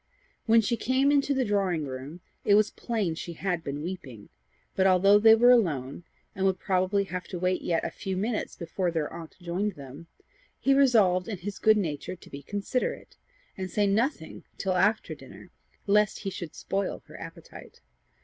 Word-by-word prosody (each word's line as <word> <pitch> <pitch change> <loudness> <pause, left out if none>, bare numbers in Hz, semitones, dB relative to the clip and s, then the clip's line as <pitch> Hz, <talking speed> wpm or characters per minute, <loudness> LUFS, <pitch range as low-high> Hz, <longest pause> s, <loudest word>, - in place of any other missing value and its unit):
When 225 0 +6
she 230 +2 -1
came 260 +5 +2
into 285 -1 +2
the 265 -2 +1
drawing 190 -7 0
room 135 +6 -7 0.2
it 205 - +5
was 215 0 +3
plain 215 -8 -2
she 170 +1 -6
had 175 -1 -2
been 145 0 -4
weeping; 140 - -7 0.5
but, 190 0 +3
although 195 +2 +5
they 220 +1 +8
were 240 +2 +6
alone, 160 - +1 0.3
and 190 - -3
would 190 -1 +1
probably 190 +1 +1
have 185 -2 -5
to 185 - -6
wait 180 +1 0
yet 165 -2 -1
a - - -3
few 190 -1 -4
minutes 215 +3 -2
before 175 +1 -2
their 160 -3 -2
aunt 165 -1 -9
joined 185 +4 -2
them, 140 +3 -11 0.5
he 275 - +3
resolved 215 -10 +4
in 215 -4 -4
his 200 +3 -6
good 215 0 +5
nature 160 -3 -3
to 175 - -16
be 140 - -7
considerate, 205 - -3 0.4
and 185 -1 -5
say 205 +2 +1
nothing 210 - -1
till 190 - -1
after 205 +4 +1
dinner, - - -13 0.3
lest 210 0 +2
he 195 - -3
should 175 -4 -7
spoil 195 0 -3
her - - -12
appetite. - - -11
190 Hz, 180 wpm, -27 LUFS, 170-210 Hz, 0.5 s, they